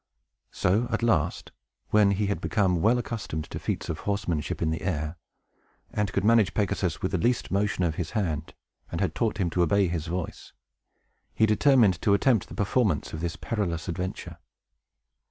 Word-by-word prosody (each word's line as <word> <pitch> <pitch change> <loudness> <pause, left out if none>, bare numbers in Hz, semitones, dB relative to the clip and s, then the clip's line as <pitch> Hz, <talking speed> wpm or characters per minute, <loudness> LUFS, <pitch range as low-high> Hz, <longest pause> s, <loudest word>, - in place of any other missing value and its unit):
So, 110 +7 +1
at 120 - -1
last, 85 -8 +1 0.4
when 105 -1 +5
he 100 +1 +1
had 100 0 -2
become 95 -6 +1
well 115 +6 +4
accustomed 110 -10 -4
to - - -4
feats - - -3
of - - -3
horsemanship 95 -7 -2
in 80 -1 0
the 80 - -3
air, 80 -3 -2 0.8
and 105 -2 -1
could 100 - 0
manage 110 -2 +4
Pegasus 95 -5 -1
with 95 - 0
the 95 - 0
least 120 +5 0
motion 100 -1 +1
of 80 -3 0
his 80 - -4
hand, 80 -6 -2 0.4
and 85 - -3
had 95 - 0
taught 110 -3 -1
him 90 -5 0
to 90 - +1
obey 95 +3 +3
his 85 -1 -3
voice, 90 0 -5 0.8
he 110 - +4
determined 110 - +4
to 100 - +4
attempt 110 -1 +2
the - - -10
performance 105 - 0
of 80 - -5
this 85 -1 -2
perilous 90 -8 -3
adventure. 90 +2 -5
95 Hz, 175 wpm, -27 LUFS, 85-105 Hz, 0.8 s, when